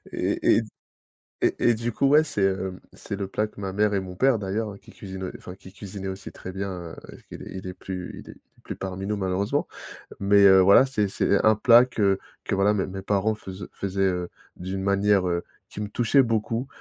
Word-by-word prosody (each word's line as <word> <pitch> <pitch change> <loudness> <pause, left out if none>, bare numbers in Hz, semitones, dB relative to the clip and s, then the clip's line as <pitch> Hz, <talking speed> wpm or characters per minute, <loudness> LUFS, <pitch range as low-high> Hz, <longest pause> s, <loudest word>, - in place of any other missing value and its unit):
Et - - +2
et - - +1
d - - -11 0.7
et - - +2 0.2
et - - +3
du 115 +2 -3
coup, 135 +5 +1
ouais, 150 +3 +6
c'est, 140 -9 -3
heu, 95 -1 -1
c'est - - -6
le 100 - -3
plat 105 +3 -1
que 105 - -16
ma 95 -2 -4
mère 105 0 +2
et 100 - +2
mon 90 -1 -7
père 130 0 +3
d'ailleurs, 100 +1 -3
qu'il - - -17
cuisinait, 95 -2 -7
enfin 90 - -10
qu'il 95 0 -15
cuisinait 100 -1 -7
aussi 95 +1 -6
très 95 - -9
bien, 90 -4 -5 0.3
qu'il - - -10
est - - -9
il 95 0 -7
est 90 - -5
plus 90 -1 -7
il - - -12
est - - -9
il - - -21 0.2
est - - -24
plus - - -6
parmi 95 0 -5
nous 105 0 -1
malheureusement. 95 +1 -1 0.5
Mais 100 +1 +4
heu, 95 -1 +8
voilà, 100 +7 +7
c'est 105 -7 0
c'est 100 +1 +1
un 110 0 +6
plat 120 +3 +6
que 100 -6 +1 0.3
que - - -1
voilà, 100 +2 +3
mes 100 - 0
mes 95 0 -7
parents 105 +2 +1
fais 95 - -9 0.2
faisaient, 100 0 -4
heu, 90 -2 -1 0.3
d'une 95 +1 -5
manière, 100 -1 +2
heu, 85 0 -1 0.2
qui - - -8
me 105 - -3
touchait 120 +5 +3
beaucoup. 115 +2 -1
100 Hz, 230 wpm, -25 LUFS, 95-105 Hz, 0.7 s, heu